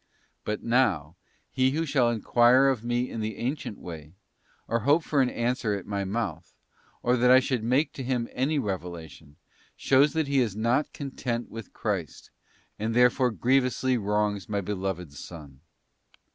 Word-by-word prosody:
But, 105 0 -3
now, 95 - +1 0.4
he 130 0 +2
who 165 +2 0
shall 135 -5 +2
enquire 120 +4 +4
of 125 -5 -1
Me 120 +1 0
in 115 - -6
the 110 0 -4
ancient 125 -3 -3
way, 80 -1 -10 0.5
or 115 - 0
hope 145 +8 +3
for 145 -2 +1
an 130 - +2
answer 120 -3 -1
at 95 - -6
My 100 -1 -3
mouth, 95 -5 -4 0.5
or 125 +1 +3
that 125 +1 +3
I 130 +1 +8
should 130 -3 -2
make 130 +7 +1
to 135 - -6
him 125 -2 -1
any 140 +5 0
revelation, 85 - -5 0.4
shows 140 +2 +3
that 160 -2 0
he 140 -1 +2
is 115 -6 0
not 120 +7 +1
content 125 -4 -4
with 115 -1 -8
Christ, 85 - -4 0.5
and 110 +2 -2
therefore 125 +1 +4
grievously 130 +2 +1
wrongs 105 -2 -1
My 100 -1 0
Beloved 95 -5 -4
Son. 70 -2 -11
115 Hz, 160 wpm, -27 LUFS, 100-130 Hz, 0.5 s, I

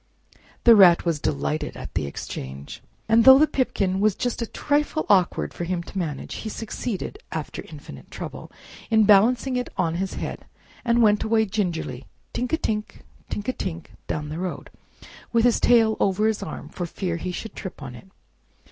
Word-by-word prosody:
The 235 -1 +8
Rat 180 -5 +7
was 165 -3 0
delighted 70 - -2
at - - -8
the - - -1
exchange, 70 0 -7 0.3
and 225 +1 +5
though 265 +2 +10
the 305 - +6
pipkin 195 -10 0
was 210 -1 +3
just 245 -1 -2
a 230 - -2
trifle 295 +4 0
awkward 185 -4 +2
for - - -5
him 170 0 -2
to - - -13
manage, 165 -7 -4
he 220 - -5
succeeded, 225 - -5
after - - -5
infinite - - -11
trouble, - - -8 0.4
in 220 -1 +5
balancing 230 +5 +4
it 250 - -3
on 170 -4 +1
his 195 - -3
head - - -5 0.4
and 235 -1 +3
went 210 -1 +4
away 220 0 +2
gingerly, 175 - -3 0.3
tink 250 0 -2
a 320 - +2
tink, 210 -7 -3 0.3
tink 205 - -4
a 255 - +1
tink, 170 -7 -5 0.2
down 150 -1 -3
the 155 +2 -5
road, 185 -1 -5 0.6
with 230 0 +3
his 245 - +3
tail 225 -2 +4
over 200 +2 +2
his 220 -1 +1
arm 195 - -6
for 175 - -5
fear 175 -1 -3
he 180 +2 -4
should 220 +5 -6
trip 190 - -7
on 130 -2 -7
it. 125 - -13
205 Hz, 185 wpm, -24 LUFS, 175-230 Hz, 0.6 s, though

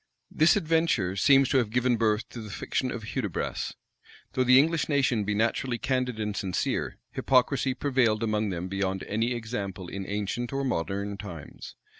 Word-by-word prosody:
This 155 +2 +4
adventure 160 - +1
seems 135 +6 +5
to 135 - +4
have 115 -4 0
given 125 +2 +2
birth 110 -1 +1
to 120 - -8
the 110 - -8
fiction 130 +5 -2
of 120 -3 -5
Hudibras. 105 -10 -3 0.6
Though 130 - +2
the 125 +1 +6
English 160 +3 +3
nation 130 -7 +2
be 105 0 0
naturally 120 +3 0
candid 125 -2 -1
and 105 -1 -2
sincere, 90 -1 -2
hypocrisy 130 0 +2
prevailed 125 -6 +1
among 105 -1 0
them 90 -1 -3
beyond 95 0 -2
any 115 +4 -1
example 100 -6 -5
in 95 -1 -5
ancient 105 +4 -2
or 135 0 -1
modern 100 - -2
times. 85 -8 -9
115 Hz, 165 wpm, -27 LUFS, 100-130 Hz, 0.6 s, the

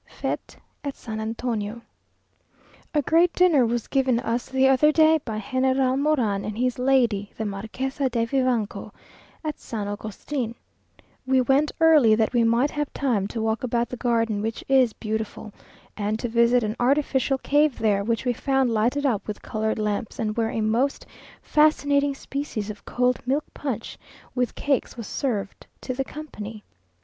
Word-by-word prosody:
Fête - - -4 0.3
at 280 -2 -4
San 220 -1 -6
Antonio 225 0 -3 1.1
A 295 -2 +1
great 335 +5 +4
dinner 320 -9 +4
was 235 0 -1
given 260 -3 +2
us 235 +1 -2
the 265 0 +3
other 270 +3 +5
day 315 0 +5
by 220 -3 -4
General 260 +1 +1
Moran 255 -9 +1
and 210 0 -5
his 250 +1 0
lady 240 -6 +2
the 220 - -2
Marquesa 255 +7 -3
de 230 -2 0
Vivanco, 245 -4 -1 0.5
at 305 -1 -4
San 210 -3 -5
Agustin. 220 +4 -4 0.7
We 260 0 +4
went 270 +4 +3
early 305 -9 +6
that 220 +2 +1
we 240 -1 +3
might 235 +5 +2
have 295 -1 -3
time 230 -8 0
to 220 +1 -4
walk 220 +1 -1
about 240 -1 0
the - - -5
garden, 230 -3 0
which 225 +1 -3
is 260 -3 +4
beautiful, 220 -1 -5 0.4
and 210 +1 -1
to 240 - -3
visit 235 +1 +3
an 215 0 -2
artificial 270 +1 +2
cave 290 0 +2
there, 205 -3 +1
which 230 +4 -1
we 245 - +2
found 265 0 +1
lighted 240 +6 +1
up 235 -7 0
with 210 - -6
coloured 220 0 -2
lamps, 210 +2 -2
and 215 -4 -2
where 225 -1 0
a 225 - -2
most 235 +6 0 0.4
fascinating 285 -2 +3
species 270 -7 -4
of 210 - -13
cold 250 0 +1
milk 280 +4 +1
punch, 250 -6 -5 0.3
with 250 -2 -1
cakes, 275 -3 -1
was 230 - -6
served 210 -6 -3
to 255 - -3
the 270 +2 -1
company. 225 -8 -8
245 Hz, 165 wpm, -24 LUFS, 220-270 Hz, 1.1 s, early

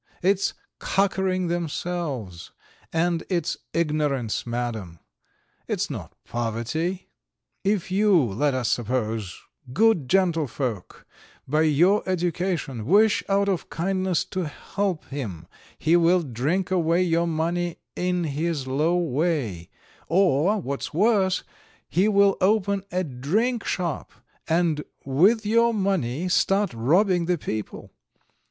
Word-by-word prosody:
It's 195 +1 +2 0.2
cockering 190 -2 0
themselves, 160 - -3 0.4
and 165 0 +1
it's 175 -4 0 0.2
ignorance, 150 -9 -1
Madam, 115 -8 -4 0.7
it's - - -1
not - - -7
poverty. 120 - -3 0.5
If 195 -2 0
you, 205 +1 +4
let 130 +3 0
us 125 -2 -1
suppose, 110 -5 -2 0.3
good 215 - +3
gentlefolk, 150 - -1 0.4
by 150 +4 +2
your 175 +8 +4
education, 175 - -2
wish 210 +5 +4
out 200 0 +2
of 190 -4 -1
kindness 185 0 0
to 185 -3 -1
help 190 +3 -3
him 115 - -5 0.3
he 160 +2 +3
will 175 +1 +4
drink 150 +9 -1
away 170 -1 +2
your 170 -1 +1
money 170 +1 -1 0.2
in 180 -1 0
his 155 -1 -2
low 150 +7 +1
way; 145 - -1 0.4
or, 180 +2 +3
what's 140 -5 -4
worse, 195 -1 +2 0.4
he 185 +4 +2
will 200 -2 +4
open 200 0 +2
a 185 +1 0
drinkshop, 180 - -1 0.4
and 165 -2 +1 0.2
with 190 - +3
your 230 +2 +3
money 185 - 0
start 195 +2 +2
robbing 175 - +2
the 180 0 +1
people. 110 -7 -5
170 Hz, 110 wpm, -24 LUFS, 135-190 Hz, 0.7 s, you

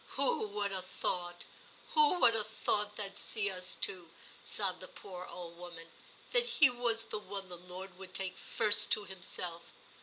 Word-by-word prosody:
*Who 480 - +4
would 205 -1 -1
ha* 190 -1 -1
thought, 175 -1 -2 0.5
who 445 -4 +6
would 230 - +8
ha* 225 - +2
thought 210 0 0
that 200 -2 -4
see*d 205 -3 -1
us 180 -1 -3
two,' 180 -3 0 0.3
sobbed 190 -3 +1
the 185 - -8
poor 180 -2 -9
old 170 -1 -8
woman, 170 -2 -9 0.4
*that 485 -1 +3
he 290 - +5
was 240 -2 0
the - - -3
one 200 -2 -6
the 180 - -6
Lord 180 +1 -9
would 185 -1 -10
take 190 -1 0
first 215 -2 +3
to 210 - 0
Himself! 180 -3 -5
195 Hz, 175 wpm, -34 LUFS, 180-210 Hz, 0.5 s, would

